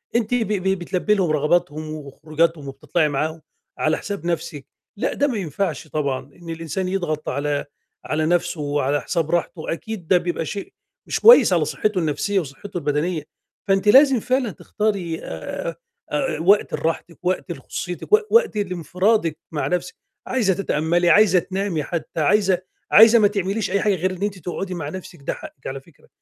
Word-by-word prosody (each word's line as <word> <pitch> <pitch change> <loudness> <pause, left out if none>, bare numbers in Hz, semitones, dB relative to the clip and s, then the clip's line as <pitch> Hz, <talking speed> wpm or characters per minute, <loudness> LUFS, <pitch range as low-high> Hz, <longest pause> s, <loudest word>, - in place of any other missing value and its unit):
أنتِ 235 0 +1
ب 230 -4 +1
ب 190 -1 0
بتلبّي 185 +4 0
لهم 180 -5 +1
رغباتهم 155 0 0
وخروجاتهم 155 +1 -2
وبتطلعي 150 +3 0
معاهم 155 +3 -2 0.4
على 155 +1 +1
حساب 200 -4 -6
نَفسِك، 160 -4 -3 0.3
لأ - - -1
ده 285 - +1
ما 240 -5 -2
ينفعش 165 -2 -3
طبعًا 140 -4 -1 0.2
إن 170 -1 -12
الإنسان 165 +3 -3
يضغط 175 -5 -2
على 145 0 -1 0.4
على 155 0 0
نَفسُه 170 -2 0
وعلى 145 0 0
حساب 165 -2 -1
راحتُه، 170 -1 -1
أكيد 195 -2 -7
ده 185 - +5
بيبقى 175 -2 -2
شيء 205 - -6 0.3
مش - - -1
كويس 475 +2 +8
على - - +2
صحتُّه 210 -3 -1
النفسية 165 +6 0
وصحتُّه 175 +5 -7
البدنية، 150 +1 -1 0.4
فأنتِ 195 +1 +2
لازم 265 +1 +7
فعلًا 255 -2 0
تختاري 195 -7 -2
آآ، - - -5 0.4
آآ، 270 - -1
وقت 200 +4 +4
لراحتِك 165 +1 -2
وقت 185 -1 -1
لخصوصيتِك 180 - -6
و 430 - +9
وقت 460 - +4
لانفرادِك 180 -1 0
مع 150 - -1
نفسِك، 180 0 -2 0.3
عايزة 220 -7 +2
تتأمَّلي، 175 -1 +1
عايزة 195 -3 +6
تنامي 190 -4 -2
حتى 165 0 -4
عايزة 190 +1 +3 0.3
عايزة 225 +2 +8
ما 205 - +6
تعمليش 200 0 -2
أي 200 - +1
حاجة 205 -2 +2
غير 185 +2 -1
إن 185 +2 -6
أنتِ 205 -2 -2
تقعدي 185 +3 -4
مع 150 -4 -4
نفسِك، 185 -1 -9
ده - - -2
حقِّك 310 0 -10
على 135 0 -5
فكرة، 150 +1 -23
175 Hz, 165 wpm, -22 LUFS, 155-200 Hz, 0.4 s, و